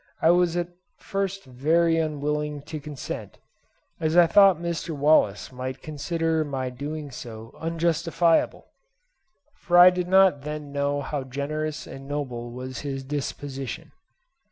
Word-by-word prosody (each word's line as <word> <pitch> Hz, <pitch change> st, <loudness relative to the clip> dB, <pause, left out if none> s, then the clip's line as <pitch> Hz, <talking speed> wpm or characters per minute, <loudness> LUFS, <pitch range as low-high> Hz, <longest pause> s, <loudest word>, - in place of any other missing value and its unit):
I 165 Hz, -, +5 dB
was 175 Hz, -1 st, +2 dB
at 175 Hz, 0 st, -1 dB, 0.3 s
first 195 Hz, 0 st, -3 dB
very 165 Hz, +6 st, +2 dB
unwilling 150 Hz, -1 st, -2 dB
to 155 Hz, +1 st, -6 dB
consent, 145 Hz, -2 st, -7 dB, 0.6 s
as 160 Hz, +1 st, +1 dB
I 175 Hz, -, +9 dB
thought 195 Hz, +1 st, +6 dB
Mr. 170 Hz, -1 st, -3 dB
Wallace 140 Hz, -9 st, +3 dB
might 130 Hz, +1 st, -6 dB
consider 160 Hz, +2 st, -1 dB
my 135 Hz, -3 st, -3 dB
doing 145 Hz, +3 st, -6 dB
so 115 Hz, -2 st, -9 dB
unjustifiable, 165 Hz, 0 st, +1 dB, 0.9 s
for 175 Hz, -2 st, +1 dB
I 180 Hz, +1 st, +10 dB
did 180 Hz, -1 st, -2 dB
not 190 Hz, -5 st, +5 dB
then 150 Hz, 0 st, -6 dB
know 140 Hz, 0 st, 0 dB
how 140 Hz, 0 st, -3 dB
generous 145 Hz, +3 st, -4 dB
and 135 Hz, 0 st, -10 dB
noble 130 Hz, -5 st, -4 dB
was 130 Hz, +2 st, -6 dB
his 135 Hz, -2 st, -4 dB
disposition. 135 Hz, -2 st, -5 dB
150 Hz, 130 wpm, -25 LUFS, 135-165 Hz, 0.9 s, I